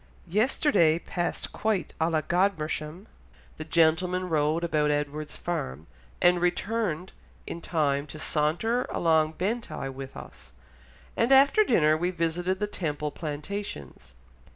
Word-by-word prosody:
"Yesterday 200 - +3
passed 175 0 -3
quite 215 -4 -1
à 165 +1 +2
la 155 -1 +2
Godmersham; 170 0 -1 0.5
the 155 - -5
gentlemen 170 +3 +2
rode 155 +1 +1
about 150 -3 +1
Edward's 150 +1 -2
farm, 80 - -4 0.3
and 175 0 +4
returned 180 -1 -1 0.3
in 170 - -6
time 145 -4 0
to 155 - -9
saunter 165 +12 0
along 160 -2 +2
Bentigh 200 - -3
with 135 0 -8
us; - - -12 0.6
and 230 +3 +1
after 275 +10 +6
dinner 155 - +3
we 175 +3 0
visited 175 +2 -1
the 210 - +1
Temple 150 -7 -3
Plantations.... 145 - -6
165 Hz, 125 wpm, -27 LUFS, 150-185 Hz, 0.6 s, after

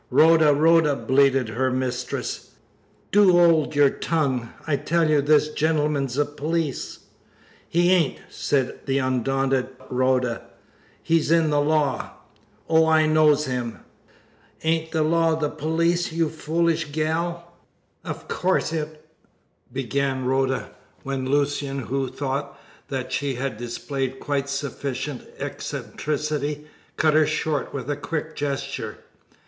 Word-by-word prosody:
"Rhoda! 160 -1 +6
Rhoda!" 155 0 +4
bleated 135 -3 +2
her 130 +4 0
mistress, 125 - -3 0.6
"do 195 -4 +6
'old 165 -4 +4
your 145 -1 +5
tongue! 135 -8 -1
I 150 -2 +1
tell 165 +3 +1
you 150 -2 +3
this 150 +1 +3
gentleman's 150 -4 0
a 145 - +3
police." 150 0 -3 0.7
"He 175 +2 +3
ain't!" 175 -6 +2
said 135 -3 -1
the 135 0 +1
undaunted 135 0 0 0.2
Rhoda. 125 -2 +1 0.6
"He's 165 -2 +2
in 165 -2 +3
the 145 0 +3
law. 150 -2 0 0.5
Oh, 160 0 +4
I 160 -1 +4
knows 155 -1 +4
him!' 125 -4 -4 0.8
"Ain't 160 0 0
the 160 -2 +1
law 165 +1 +2
the 150 -2 -1
police, 170 +3 0
you 165 -1 0
foolish 165 +1 0
gal?" 170 +3 -2 0.5
"Of - - -6
course 185 -3 0
it 155 -1 -5 0.3
" - - -43 0.3
began 135 0 -1
Rhoda, 130 0 0 0.3
when 135 -1 -3
Lucian, 145 -1 0
who 135 +1 -2
thought 140 +2 -4 0.3
that 130 -2 -4
she 140 -1 -1
had 130 0 -3
displayed 130 +3 -4
quite 140 -1 -2
sufficient 140 -1 -4
eccentricity, 150 0 -3 0.3
cut 155 -1 +3
her 155 -1 +4
short 155 -1 -1
with 135 - -5
a 145 - -1
quick 155 +2 -4
gesture. 140 -2 -3
145 Hz, 125 wpm, -24 LUFS, 135-160 Hz, 0.8 s, Rhoda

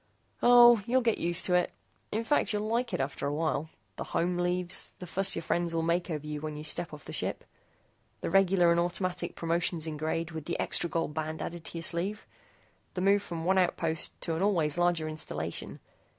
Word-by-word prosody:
"Oh, 240 -2 +8
you'll 255 +2 +3
get 230 -2 +1
used 175 +1 +1
to 180 - +1
it. 180 0 +2 0.4
In 220 +2 -1
fact, 290 +6 +2
you'll 210 +1 -1
like 235 +2 0
it - - -2
after 135 +1 -2
a 145 - -1
while. 155 -1 -1 0.3
The - - -3
home 175 +1 0
leaves. 180 0 0
The 180 - -8
fuss 195 +3 -1
your 165 - -4
friends 170 +1 -1
will 165 - +1
make 170 +2 0
over 150 -2 -4
you 150 -1 -4
when 155 -1 -5
you 150 - -6
step 170 +2 -3
off 150 -2 -11
the - - -8
ship. - - -3 0.8
The - - -3
regular 190 -3 +4
and 170 - +3
automatic 175 +1 -2
promotions 170 -1 0
in 155 -2 -4
grade 160 +2 -2
with 160 -2 -6
the 170 - -3
extra 170 - +2
gold 165 -1 -2
band 155 +1 -3
added 170 -1 -6
to - - -5
your 165 - -4
sleeve; 180 +6 -1 0.7
the 180 - -2
move 200 +2 +4
from 170 -4 -6
one 190 +1 +3
outpost 165 -3 0
to 165 - -1
an 165 - -2
always 170 -7 +2
larger 175 -2 +1
installation. 85 - -4
170 Hz, 210 wpm, -29 LUFS, 160-185 Hz, 0.8 s, Oh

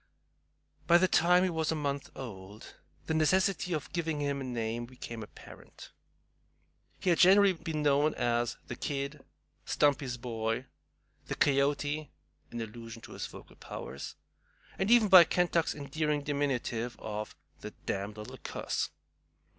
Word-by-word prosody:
By 170 - +7
the 185 +2 +4
time 180 +1 +4
he 185 - +1
was 160 -1 0
a - - 0
month 140 -2 -2
old 105 -5 -9 0.3
the - - -1
necessity 180 +2 +2
of 155 -3 -4
giving 160 -3 -1
him 140 -1 -1
a - - -3
name 120 -1 -3
became 120 -2 -8
apparent. 105 - -12 1.1
He 180 - +2
had 170 - +2
generally 195 +1 +7
been 160 -3 -4
known 145 +1 +3
as 120 0 0
"The 120 - -6
Kid," 140 +2 -4 0.4
"Stumpy's 140 -4 +1
Boy," 115 0 -2 0.6
"The - - -3
Coyote" 145 +2 +1 0.4
(an 120 - -5
allusion 115 +1 -8
to - - -11
his - - -4
vocal - - -13
powers), 70 - -7 0.6
and 195 - +1
even 235 -2 +6
by 185 -3 +10
Kentuck's 170 -1 +1
endearing 150 +1 -1
diminutive 130 -5 -1
of 105 0 -5 0.2
"The - - -6 0.2
damned 100 +2 -3
little 105 0 -8
cuss." - - -3
140 Hz, 140 wpm, -31 LUFS, 120-160 Hz, 1.1 s, by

